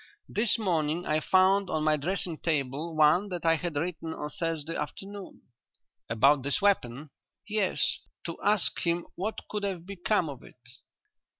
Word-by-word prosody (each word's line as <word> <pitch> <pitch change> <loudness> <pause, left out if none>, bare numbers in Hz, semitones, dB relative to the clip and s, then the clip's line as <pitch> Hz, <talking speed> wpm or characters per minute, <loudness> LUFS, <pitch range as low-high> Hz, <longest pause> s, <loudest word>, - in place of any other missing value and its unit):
This 220 +2 +2
morning 170 -5 0
I 155 0 +1
found 190 +3 +3
on 155 -1 0
my 155 0 +4
dressing 170 +1 -2
table 155 +1 -2
one 155 +6 +4
that 175 -2 -5
I 165 0 +5
had 170 -1 -4
written 160 +1 -3
on 150 0 -5
Thursday 165 -3 -3
afternoon." 195 +6 -6 0.7
"About 135 +5 +4
this 140 +1 0
weapon?" 150 -8 0 0.4
"Yes; 210 -3 +1 0.3
to 170 - -6
ask 205 -2 +3
him 170 0 0
what 210 +4 -3
could 210 - -3
have 190 -4 -3
become 195 -1 0
of 140 -4 -7
it." - - -16
170 Hz, 155 wpm, -29 LUFS, 150-195 Hz, 0.7 s, I